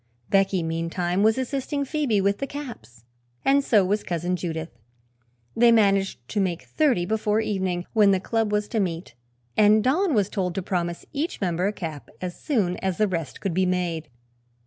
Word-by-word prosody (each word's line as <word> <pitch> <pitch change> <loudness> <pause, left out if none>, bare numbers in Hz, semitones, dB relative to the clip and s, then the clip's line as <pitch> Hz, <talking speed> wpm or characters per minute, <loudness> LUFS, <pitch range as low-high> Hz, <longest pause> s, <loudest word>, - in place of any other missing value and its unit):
Becky, 195 -2 +3
meantime, 165 +3 -1
was 220 +2 +4
assisting 275 +2 -2
Phoebe 275 -7 0
with 200 +1 +1
the 275 - -2
caps, 225 - -9 0.4
and 280 +1 +4
so 210 -7 +4
was 205 +3 +1
Cousin 175 +1 -2
Judith. 165 -2 -4 0.8
They 235 0 +6
managed 195 - +2
to 210 - -1
make 180 -3 -1
thirty 260 - +1
before 215 +1 +1
evening, 190 -5 -1
when 210 -3 +5
the 190 -1 +3
club 225 +2 -1
was 210 0 0
to 225 - -1
meet, 170 -6 -3 0.4
and 210 0 +5
Don 310 +5 +2
was 205 -3 +3
told 185 -4 -2
to 195 - -2
promise 175 -2 -2
each 300 +4 -2
member 180 -1 0
a - - +1
cap 160 -8 -7
as 180 -1 -5
soon 205 - 0
as 190 -2 -2
the 215 - +3
rest 165 -8 -4
could 195 - -1
be 185 +2 +2
made. 175 -3 -1
195 Hz, 180 wpm, -25 LUFS, 175-220 Hz, 0.8 s, They